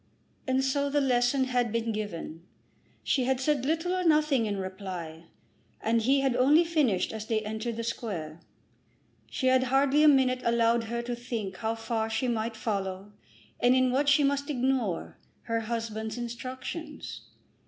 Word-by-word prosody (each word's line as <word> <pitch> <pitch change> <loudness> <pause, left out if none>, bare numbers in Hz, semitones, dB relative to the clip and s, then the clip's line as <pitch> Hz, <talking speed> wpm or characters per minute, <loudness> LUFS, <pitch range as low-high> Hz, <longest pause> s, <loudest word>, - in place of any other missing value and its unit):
And 260 0 +2
so 280 +1 0
the 290 +1 +2
lesson 255 0 +2
had 250 -3 0
been 230 0 -1
given. 175 -6 -5 0.6
She 260 -3 +1
had 260 0 +1
said 270 -1 0
little 330 +4 0
or 370 0 0
nothing 300 -7 +3
in 205 -1 -2
reply, 185 -4 -6 0.5
and 230 +1 +1
he 270 +4 +3
had 265 -3 +1
only 290 +7 +5
finished 295 - +1
as 220 0 -6
they 220 -1 0
entered 220 +2 -4
the 230 - -3
Square. 170 -9 -4 0.9
She 260 - -3
had 260 0 +4
hardly 270 +3 +3
a 305 - +7
minute 260 -3 +4
allowed 235 0 +2
her 235 +1 -3
to 240 0 -3
think 230 -6 -5
how 225 0 -2
far 225 0 -2
she 225 +3 -1
might 230 -1 -1
follow, 200 -2 -3 0.5
and 245 +1 +4
in 255 -1 +3
what 280 +3 +2
she 285 +1 +5
must 280 +1 0
ignore, 255 - -1 0.2
her 230 -1 -1
husband's 220 0 -4
instructions. 255 +6 -6
240 Hz, 165 wpm, -28 LUFS, 220-270 Hz, 0.9 s, a